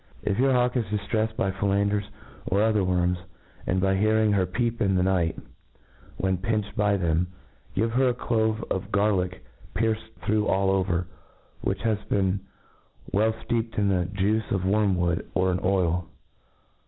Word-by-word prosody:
If 100 +2 0
your 135 +1 +4
hawk 125 0 +2
is 115 - 0
diftreffed 110 +2 -1
by 95 - 0
fellanders 100 +1 +1 0.4
or 100 - +1
other 110 -2 +2
worms, 90 -1 +1 0.5
and 90 - +1
by 95 +1 +2
hearing 110 +2 +3
her 95 -3 +2
peep 115 +5 -1
in 95 -3 +2
the 90 - +2
night 90 -3 +1
time, - - -12 0.7
when 95 -1 0
pinched 105 +1 -2
by 105 -2 +2
them, 85 -1 +1 0.5
give 115 +4 +1
her 130 +2 +3
a - - +1
clove 110 -2 0
of 100 +2 -2
gar 105 +1 +3
lick 90 -4 -2 0.3
pierced 110 0 -1
through 105 0 +2
all 95 0 +2
over, 90 -2 +1 0.6
which 95 0 -2
has 110 -2 +1
been 95 -1 +1 0.7
well 110 +3 +3 0.2
fteepedin 115 -3 0 0.2
thejuice 100 +3 0
of 95 -2 -1
worm 100 0 +2
wood 85 -1 0
or 95 0 +2
in 90 - 0
oil. 90 -2 +1
100 Hz, 165 wpm, -26 LUFS, 95-110 Hz, 0.7 s, your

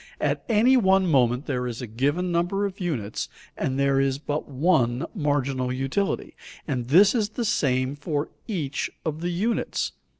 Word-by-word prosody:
At - - 0
any 235 +4 +5
one 190 -4 +4
moment 130 -4 +2
there 125 -4 -2
is 120 -2 -5
a 125 - -4
given 145 +11 -1
number 175 +4 +1
of 200 -1 -5
units 135 - -3 0.3
and 130 0 -2
there 140 0 +3
is 135 -1 +1
but 145 +1 -4
one 135 -4 +2
marginal 140 - 0
utility, 135 +10 -2 0.3
and 125 -5 -2
this 190 +9 +6
is 215 -4 +1
the 235 +2 -3
same 130 -7 +1
for 145 0 -2 0.2
each 155 - -2 0.2
of 155 0 -3
the 175 - -1
units. 205 +7 -1
145 Hz, 165 wpm, -25 LUFS, 130-185 Hz, 0.3 s, this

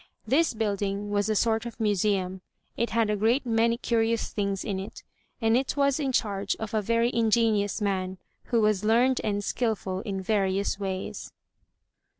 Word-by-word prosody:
This 305 -1 +2
building 205 -1 -2
was 205 +1 +1
a 215 - +1
sort 225 +1 +1
of 235 - -10
museum; 195 -3 0 0.3
it 235 - -1
had 225 -2 +1
a - - +1
great 230 +7 +2
many 230 0 +2
curious 230 -1 0
things 200 -2 -2
in 195 -3 -2
it, 195 - -8 0.4
and 225 -1 +3
it 265 +3 0
was 280 0 +2
in 275 -3 0
charge 200 -5 0
of 220 0 -6
a 215 - +2
very 230 +3 +1
ingenious 220 -2 +2
man, 190 -2 -1 0.3
who 235 -2 +1
was 210 -2 +2
learned 240 +4 +3
and 205 -1 -1
skilful 205 -5 -1
in 195 -1 -4
various 195 0 0
ways. 190 -1 -4
215 Hz, 165 wpm, -27 LUFS, 200-230 Hz, 0.4 s, and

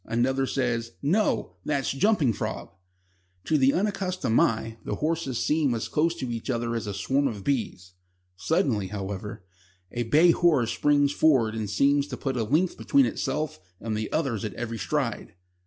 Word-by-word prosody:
Another 130 +3 0
says: 115 -4 -1
"No; 155 - 0
that's 140 -3 -1
Jumping 145 - +2
Frog." - - -5 0.7
To 160 - +1
the 135 -2 +4
unaccustomed 185 - 0
eye 115 0 0
the - - -3
horses 155 -5 -2
seem 150 -2 +1
as 115 - -3
close 165 +2 +1
to 130 -7 -4
each 115 +3 -6
other 120 -1 -1
as 115 -2 -3
a 100 - -3
swarm 135 +8 +1
of 105 -6 -5
bees. 110 -9 -2 0.4
Suddenly, 110 - 0
however, 100 0 -6 0.5
a 120 - -3
bay 155 +9 +5
horse 150 -10 +2
springs 145 -1 +2
forward 130 -8 +3
and 110 -2 -3
seems 140 +7 +2
to - - -6
put 135 -2 -3
a 120 - 0
length 155 +11 +1
between 280 -1 +3
itself 155 - -2 0.2
and 110 0 -3
the 110 0 -3
others 130 -10 -1
at 105 -4 -4
every 115 -1 -4
stride. 85 - -2
130 Hz, 170 wpm, -26 LUFS, 115-150 Hz, 0.7 s, bay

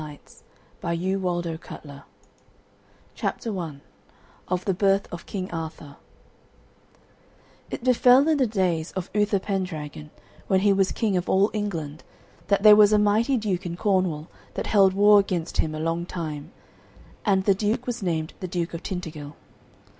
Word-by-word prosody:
Stories 150 -2 -12 0.4
of 170 0 -2
King 190 +2 -1
Arthur 175 -2 -2 1.5
CHAPTER 215 -5 -3
I 155 -5 -6 0.7
OF 180 0 -2
THE 195 - +1
BIRTH 195 +1 +2
OF 170 - -8
KING 190 -2 -5
ARTHUR 160 -3 -7 1.7
It - - -6
befell 255 +2 +5
in 315 -2 +2
the 260 - +3
days 180 -6 -1
of 185 -1 -5
Uther 210 0 +2
Pendragon, 165 -7 -4 0.4
when 190 -1 +3
he 200 0 +4
was 195 -1 +2
king 215 -4 0
of 175 - -3
all 195 +3 +3
England, 165 -8 -4 0.4
that 200 0 +2
there 210 -1 +10
was 210 0 +6
a 210 - +5
mighty 215 +6 +2
duke 195 -5 -2
in 170 0 -5
Cornwall 185 -6 0 0.3
that - - -3
held 195 -3 +4
war 205 +1 +7
against 180 -4 -2
him 155 -1 0
a - - -5
long 165 +2 -2
time. 155 -3 -6 0.7
And 195 -3 +2
the 200 - +4
duke 215 +5 -1
was 245 -2 -4
named 160 -4 -2
the 185 - -4
Duke 175 -1 -3
of 170 - -5
Tintagil. 155 -5 -6
185 Hz, 155 wpm, -25 LUFS, 165-205 Hz, 1.7 s, there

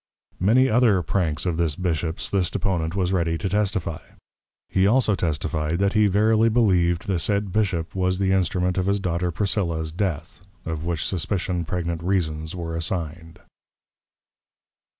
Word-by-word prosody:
Many 120 +8 +4
other 110 -7 +3
Pranks 80 -1 -1
of 85 -3 -1
this 80 -4 0
Bishop's 85 -2 -2
this 95 -4 +1
Deponent 85 -3 -1
was 95 -1 0
ready 85 -2 +1
to 95 - -3
testify. 95 -5 -1 0.7
He 95 +1 +2
also 115 -1 +3
testify'd, 80 -2 -1
That 100 +1 +1
he 105 -1 +4
verily 110 +3 +3
believ'd, 90 -6 +2
the 95 -4 0
said 100 +2 0
Bishop 95 -6 -1
was 95 -1 0
the 95 0 +1
Instrument 90 -1 +1
of 90 - -1
his 100 +1 +2
Daughter 90 -1 -1
Priscilla's 85 -4 -1
Death; 90 -1 -3 0.2
of 80 -1 -4
which 85 -2 -2
suspicion, 90 -1 -2
pregnant 85 -1 -3
Reasons 80 -3 -1
were 85 -2 -4
assigned. 80 0 -4
90 Hz, 150 wpm, -24 LUFS, 85-100 Hz, 0.7 s, Many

